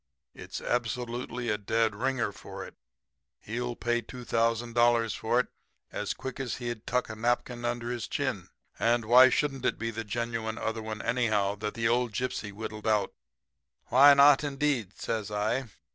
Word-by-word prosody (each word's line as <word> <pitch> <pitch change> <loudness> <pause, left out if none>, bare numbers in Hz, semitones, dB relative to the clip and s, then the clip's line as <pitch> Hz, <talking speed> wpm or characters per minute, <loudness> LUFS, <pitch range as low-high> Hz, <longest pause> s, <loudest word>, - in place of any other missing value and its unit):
It's - - -7
absolutely 120 0 -2
a 105 -1 0
dead 110 +2 +1
ringer 120 0 -1
for - - -9
it. - - -12 0.7
He'll 120 +2 -4
pay 120 0 0
$2,000 115 -1 +1
for 120 +2 +1
it 125 - 0 0.4
as - - -3
quick 130 0 -6
as 130 -3 -2
he'd 120 -3 -5
tuck 125 +1 0
a 110 - -6
napkin 120 +1 -1
under 120 0 -2
his 120 -1 -4
chin. - - -2 0.3
And 120 -1 +2
why 125 +3 +8
shouldn't 135 -2 0
it - - +1
be 115 0 -3
the 115 +1 -4
genuine 115 0 -3
other 110 -1 -2
one, 110 -1 -5
anyhow, 110 -5 +1
that 105 +1 -4
the 115 0 +1
old 120 -1 +1
gypsy 125 -3 -3
whittled 105 +1 -6
out?' 105 -3 +2 0.8
"'Why 140 +3 +8
not, 140 +1 +7
indeed?' 140 -8 -1
says 110 -3 -2
I. 110 +5 -1
120 Hz, 160 wpm, -29 LUFS, 110-125 Hz, 0.8 s, why